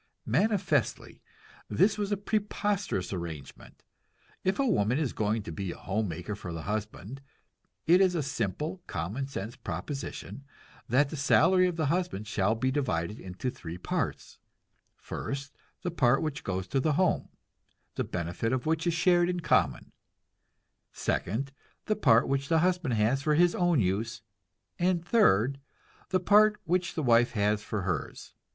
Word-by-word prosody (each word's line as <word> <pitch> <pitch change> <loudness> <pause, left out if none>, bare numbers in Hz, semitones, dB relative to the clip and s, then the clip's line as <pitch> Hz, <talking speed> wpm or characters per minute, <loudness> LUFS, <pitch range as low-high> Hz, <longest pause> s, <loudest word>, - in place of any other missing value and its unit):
Manifestly, 200 - 0 0.5
this 200 +2 +3
was 205 -1 -2
a 205 - +1
preposterous 205 - -1
arrangement. 85 -6 -8 0.6
If 190 +1 +1
a 275 - +2
woman 115 - +2
is 150 -5 -1
going 110 0 0
to 85 - -7
be 95 +2 -4
a - - -9
home 105 +3 -2
maker 90 +4 -5
for 95 -4 -8
a 80 -1 -5
husband, 110 +4 -5 0.6
it 180 +3 +6
is 185 -2 +3
a 160 - 0
simple, 150 - -3
common 100 - -3
sense 115 -4 -6
proposition 140 -1 -6 0.5
that 135 +4 +3
the - - -4
salary 185 +6 +4
of 180 - -2
the 160 -2 0
husband 170 - -1
shall 105 +1 +1
be 130 +3 0
divided 105 - -1
into 95 +7 -4
three 85 -5 -8
parts 90 - -3 0.6
first, 140 +1 -6 0.3
the 175 - -1
part 135 -4 +3
which 155 -2 -3
goes 95 -1 -3
to 135 - +1
the 150 +3 +1
home, 185 +4 +1 0.6
the - - -1
benefit 90 +6 -3
of 130 -1 -1
which 160 +2 0
is 170 - +1
shared 175 0 +3
in 180 -1 -2
common; 80 - +1 1.0
second, 125 +10 -2 0.3
the 215 - +1
part 115 - +4
which 140 0 0
the 165 - +4
husband 175 -9 +1
has 110 +6 +2
for 150 0 +2
his 175 +2 +4
own 175 -7 +2
use; 110 +3 -1 0.6
and 175 -1 +1
third, 135 - +3 0.5
the 185 - +2
part 210 +3 +5
which 180 +1 0
the 160 - -1
wife 120 -1 +4
has 105 -1 +1
for 110 -2 -3
hers. 90 -7 -4
135 Hz, 160 wpm, -29 LUFS, 105-175 Hz, 1.0 s, it